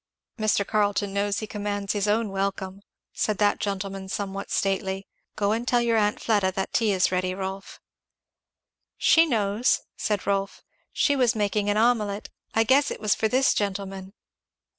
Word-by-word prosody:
"Mr. 215 -2 +2
Carleton 205 -1 0
knows 200 0 0
he - - -3
commands 205 -2 -3
his 205 -1 -1
own 215 +1 +1
welcome," 195 0 -3 0.3
said 215 -2 -1
that 205 -1 +2
gentleman 195 -1 -4
somewhat 195 0 -4
stately. 195 0 -1 0.3
"Go 205 -1 +1
and 230 +3 -1
tell 245 - +3
your 235 -1 +1
aunt 210 -1 +1
Fleda 205 -4 +1
that 190 0 -3
tea 225 -3 +2
is 190 -2 +2
ready, 185 0 -1
Rolf." 195 0 -6 1.2
"She 330 0 +5
knows," 220 -2 +1
said 210 -2 -2
Rolf. 195 0 -1 0.3
"She 285 - +2
was 250 -3 +2
making 205 -1 0
an 205 - +1
omelette 215 -3 +1 0.3
I 225 - +4
guess 270 +5 +3
it - - -5
was 210 -2 +2
for 220 - 0
this 260 +4 +3
gentleman!" 195 -1 -3
205 Hz, 160 wpm, -25 LUFS, 195-215 Hz, 1.2 s, She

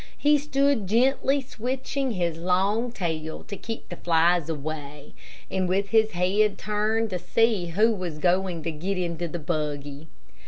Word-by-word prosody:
He 295 0 +4
stood 275 -6 +1
gently 265 +5 +3
switching 260 +1 -3
his 175 -4 -1
long 195 +7 +1
tail 160 -7 -4
to 200 - -7
keep 225 +3 -6
the 175 - -7
flies 170 -1 +3
away, 150 -1 -6 0.4
and 185 -1 0
with 195 +2 +1
his 220 -1 +3
head 195 +4 +2
turned 215 +1 0
to 180 - -2
see 220 -3 +2
who 210 +7 +3
was 180 -6 -4
going 180 0 +1
to 165 - -2
get 180 +6 -3
into 170 -1 -2
the 170 - -5
buggy. 150 -2 -4
185 Hz, 155 wpm, -26 LUFS, 165-225 Hz, 0.4 s, He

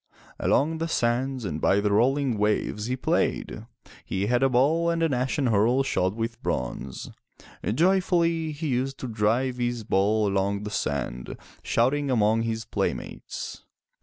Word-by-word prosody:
Along 160 +3 +1
the 165 - -1
sands 125 -2 0
and 80 -4 -3
by 100 - +3
the 105 0 +1
rolling 125 +2 +2
waves 105 +1 0
he 125 - 0
played. 130 - -1 0.4
He 95 +1 -2
had 120 +3 +1
a 135 - +4
ball 150 +7 +3
and 165 0 0
an 160 -4 +2
ashen 130 +3 0
hurle 120 +4 +3
shod 95 -7 0
with 115 +1 -4
bronze. 65 +1 -4 0.5
Joyfully 170 - +2
he 150 +1 -4
used 135 +2 -1
to 130 - -3
drive 115 +3 0
his 120 -2 -2
ball 105 +2 +2
along 100 +1 0
the 105 - -5
sand, 60 - -3 0.2
shouting 140 +4 +1
among 110 -2 +3
his 115 -1 -2
playmates. - - -4
120 Hz, 150 wpm, -26 LUFS, 105-135 Hz, 0.5 s, a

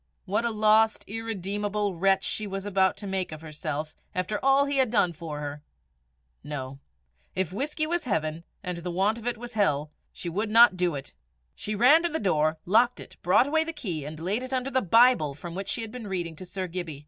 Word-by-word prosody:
What 205 +4 0
a - - +2
lost, 220 0 +3
irredeemable 205 -1 -2
wretch 195 +4 +1
was 195 0 -4
she - - -6
about 190 -1 +2
to 205 - -8
make 190 -3 -2
of 155 0 -8
herself 155 -1 -5 0.2
after 185 +3 -2
all 270 +1 +5
he 285 0 -1
had 260 -3 +4
done 200 -6 +2
for 155 -2 -6
her! 145 0 -5 0.8
No; 135 -2 -6 0.6
if 185 -2 -1
whisky 300 +7 -1
was 340 0 -1
heaven, 160 -6 -1 0.2
and 180 -2 -3
the 175 +1 -5
want 195 +6 +1
of 230 - -7
it 245 - -1
was 240 +1 -8
hell, 150 -8 +1 0.2
she - - -8
would 205 +6 -1
not 230 -2 +7
do 180 -3 0
it! 135 - -7 0.4
She 215 - -4
ran 255 +10 +6
to 345 - 0
the 320 - -2
door, 155 -5 +1
locked 235 +6 +3
it, - - -10
brought 185 +8 +4
away 315 +3 +2
the 330 +1 -5
key, 180 - -4
and 150 +2 -7
laid 195 +8 -1
it 255 +1 -6
under 260 +1 -1
the 260 0 +2
Bible 225 - +4
from 170 +3 -8
which 195 +2 -5
she 235 - -1
had 220 - -5
been 240 -3 -7
reading 175 -4 -3
to 185 - -8
Sir 190 0 -3
Gibbie. 170 -5 -5
195 Hz, 220 wpm, -27 LUFS, 170-230 Hz, 0.8 s, not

